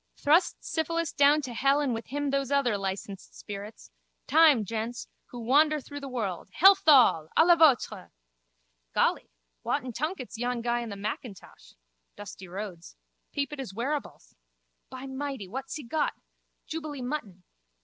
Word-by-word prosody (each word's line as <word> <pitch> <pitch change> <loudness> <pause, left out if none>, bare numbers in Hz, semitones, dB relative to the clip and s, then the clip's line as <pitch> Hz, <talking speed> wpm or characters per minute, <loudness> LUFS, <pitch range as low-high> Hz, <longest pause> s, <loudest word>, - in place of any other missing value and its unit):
Thrust 315 +5 +2
syphilis 330 0 -2
down 290 +1 +4
to 250 -2 -5
hell 275 +4 +2
and 280 -4 0
with 225 0 -5
him 285 +1 -2
those 275 -1 0
other 280 -6 +2
licensed 195 0 -5
spirits. 205 +1 -9 0.3
Time, 305 -8 +5
gents! 230 +3 -4 0.2
Who 245 - -9
wander 300 +6 +3
through 285 +1 -9
the 280 -1 -7
world. 205 -9 -4
Health 390 +1 +6
all! 245 - +6
À 320 - +7
la 345 0 +7
vôtre! 315 -7 +3 0.9
Golly, - - +1 0.3
whatten 250 - -2
tunket's 285 - -4
yon 245 -1 -2
guy 240 0 0
in 235 -1 -5
the 200 - -6
mackintosh? 205 +1 -8 0.4
Dusty 195 -2 -10
Rhodes. 180 -2 -8 0.4
Peep 285 0 -3
at 295 - -7
his 235 -8 -6
wearables. 280 +6 -4 0.6
By 260 +1 -8
mighty! 265 -5 -5
What's 265 +7 -6
he 300 - -6
got? 295 +6 -1 0.5
Jubilee 305 -4 -6
mutton. 235 -10 -5
260 Hz, 150 wpm, -28 LUFS, 220-295 Hz, 0.9 s, À